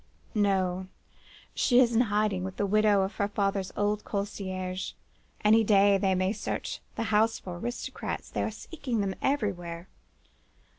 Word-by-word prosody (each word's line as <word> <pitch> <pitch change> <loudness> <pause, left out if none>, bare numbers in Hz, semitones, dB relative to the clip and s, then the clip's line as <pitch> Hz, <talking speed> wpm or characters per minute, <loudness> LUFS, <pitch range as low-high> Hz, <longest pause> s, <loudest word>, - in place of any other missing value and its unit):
"'No! 190 -3 +1 0.7
she 250 -2 +4
is 240 -2 +4
in 230 - +4
hiding 205 -3 +1
with 190 0 -5
the 205 - +1
widow 205 -1 +4
of 190 0 -4
her 200 - +1
father's 195 -2 -1
old 205 +1 0
concierge. 190 -2 -4 0.5
Any 220 +2 +6
day 200 -1 +5
they 190 -1 +2
may 185 +2 +1
search - - -4 0.2
the - - -1
house 220 +2 +4
for 175 -2 -7
aristocrats. 240 +5 -5
They - - -1
are - - 0
seeking 255 - -4
them 195 -1 -1
everywhere. 185 -10 -2
200 Hz, 150 wpm, -28 LUFS, 190-215 Hz, 0.7 s, Any